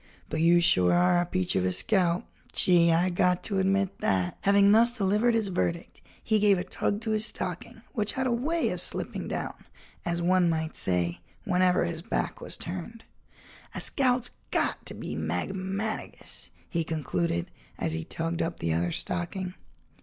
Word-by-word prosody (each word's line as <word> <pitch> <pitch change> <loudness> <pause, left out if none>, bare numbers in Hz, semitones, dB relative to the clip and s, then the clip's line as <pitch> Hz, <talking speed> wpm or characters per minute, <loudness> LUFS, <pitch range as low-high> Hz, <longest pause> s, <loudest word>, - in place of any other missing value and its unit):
But 155 - -1
you 170 +1 +5
sure 90 - +4
are 175 0 +4
a 175 - 0
peach 185 0 0
of 95 - +2
a 95 - +1
scout—gee, 175 - +2
I 175 +3 +2
got 180 0 +2
to 200 -3 -1
admit 195 0 +1
that." 90 -2 0
Having 200 0 +5
thus 230 +3 +6
delivered 220 +1 +2
his 220 -3 0
verdict, 170 -2 -2 0.2
he 220 -1 +2
gave 205 -2 +4
a 180 - -2
tug 205 +3 -2
to 225 -1 -2
his 215 0 +4
stocking 185 +4 -4
which 210 -2 0
had 265 - -1
a 255 - +1
way 300 +8 0
of - - -3
slipping - - -3
down, - - -3 0.5
as 170 0 -1
one 180 0 +3
might 160 -1 -2
say, 90 -1 +1 0.2
whenever 180 -3 +2
his 170 -1 -4
back - - -3
was - - -5
turned. 190 +6 -6 0.7
"A - - -3
scout's 255 -3 +1 0.2
got - - -1
to - - -3
be 75 - -5
magmanigous," 190 - -4 0.2
he 165 -1 -1
concluded, 90 - -2 0.3
as 80 - -1
he 80 0 -3
tugged 165 - -3
up 165 +1 -3
the 80 -1 0
other 85 +2 0
stocking. 180 - -3
180 Hz, 170 wpm, -28 LUFS, 165-200 Hz, 0.7 s, thus